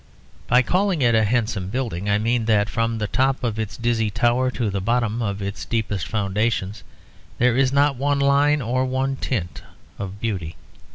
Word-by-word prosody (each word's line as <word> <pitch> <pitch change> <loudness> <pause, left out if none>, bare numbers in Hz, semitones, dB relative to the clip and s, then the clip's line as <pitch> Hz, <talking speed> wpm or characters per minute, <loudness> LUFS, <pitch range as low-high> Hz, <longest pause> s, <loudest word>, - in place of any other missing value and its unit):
By 125 +2 +4
calling 185 -1 +1
it 120 -1 +4
a 110 -1 +4
handsome 110 -4 -1
building 105 -5 -3
I 100 - +3
mean 115 +2 0
that 105 -2 +2
from 115 0 0
the 110 - -1
top 130 +5 0
of 115 -2 -1
its 110 -2 -4
dizzy 115 -2 0
tower 120 +4 +1
to 120 -4 -2
the 100 0 -2
bottom 115 +1 0
of 100 -2 -2
its 100 +1 -5
deepest 105 -5 -2
foundations 105 -1 -1 0.5
there 120 0 +3
is 130 0 +3
not 140 -1 +2
one 140 +2 +1
line 140 +1 +3
or 125 +3 0
one 130 +1 -1
tint 100 -10 -3 0.4
of 100 0 -6
beauty. 95 -9 -3
115 Hz, 180 wpm, -22 LUFS, 105-130 Hz, 0.5 s, By